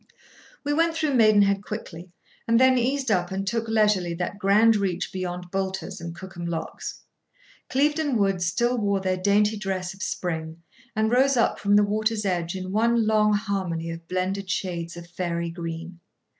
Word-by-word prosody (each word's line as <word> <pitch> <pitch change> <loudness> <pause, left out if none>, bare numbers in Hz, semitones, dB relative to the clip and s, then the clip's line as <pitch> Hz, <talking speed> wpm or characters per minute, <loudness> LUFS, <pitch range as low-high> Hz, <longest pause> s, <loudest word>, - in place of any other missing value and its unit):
[Picture: - - -33
River - - -29
scene] - - -25
We 290 0 0
went 330 +2 +2
through 310 -3 0
Maidenhead 205 -4 +4
quickly, 185 -5 -7 0.4
and 230 0 +4
then 260 0 +6
eased 260 +1 0
up, 175 -3 +1
and 195 +1 -3
took 230 +3 -1
leisurely 210 -6 +2
that 180 +3 -4
grand 210 +3 +5
reach 195 -4 -1
beyond 180 -1 -5
Boulter's 190 -1 -3
and 170 0 -6
Cookham 175 -1 -7
locks. 165 -1 -5 0.7
Clieveden 295 0 +1
Woods 195 -4 +1
still 240 +7 +1
wore 200 -2 +1
their 185 -1 -1
dainty 205 +3 +2
dress 190 -2 -3
of 190 - -14
spring, 165 -3 -4 0.3
and 220 +1 +1
rose 265 +2 +4
up, 230 - +2
from 205 0 +3
the 205 - +6
water's 215 +1 0
edge, 175 -2 -1
in 185 0 -5
one 230 +2 +2
long 215 -1 +3
harmony 190 -6 -2
of 165 0 -9
blended 185 +2 -2
shades 170 -3 -3
of 170 - -8
fairy 170 -1 -3
green. 170 0 -6
195 Hz, 180 wpm, -25 LUFS, 175-220 Hz, 0.7 s, then